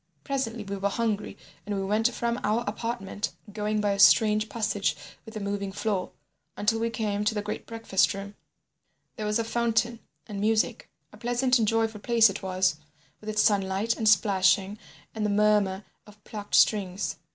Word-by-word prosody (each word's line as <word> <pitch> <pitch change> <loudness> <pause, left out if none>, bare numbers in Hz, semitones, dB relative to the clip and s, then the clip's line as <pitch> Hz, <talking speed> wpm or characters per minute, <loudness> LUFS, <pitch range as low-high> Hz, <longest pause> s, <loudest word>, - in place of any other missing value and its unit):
"Presently 245 -6 -3
we 200 0 -5
were 200 +1 0
hungry 215 -1 -2 0.3
and 205 0 -3
we 195 - -2
went 220 +4 +2
from 235 +1 -2
our 215 +3 +1
apartment, 210 -1 -4 0.2
going 210 0 -1
by 205 -1 +1
a 200 - -2
strange 215 +1 +5
passage 210 -3 -1 0.3
with 220 0 -8
a - - -3
moving 200 -1 -3
floor, 195 -2 -2 0.5
until 225 +2 +1
we 230 +1 0
came 215 -3 -2
to 210 +1 0
the 210 - -1
great 210 0 -5
breakfast 225 -5 +1
room—there 200 +2 -12
was 210 - +1
a 230 - 0
fountain 235 0 0 0.3
and 205 -3 -6
music. 225 - 0 0.2
A - - -13
pleasant 245 +1 +1
and 220 - +1
joyful 225 -1 0
place 225 -1 +4
it 195 - -7
was, 185 -4 0 0.4
with 215 - -8
its 210 0 +2
sunlight 200 +1 +1
and 220 -1 +2
splashing, 195 0 +3 0.3
and 220 - -3
the 210 - +1
murmur 205 -1 +2 0.2
of 210 0 -18
plucked 205 -1 -4
strings. 190 -4 +2
210 Hz, 175 wpm, -27 LUFS, 200-225 Hz, 0.5 s, strange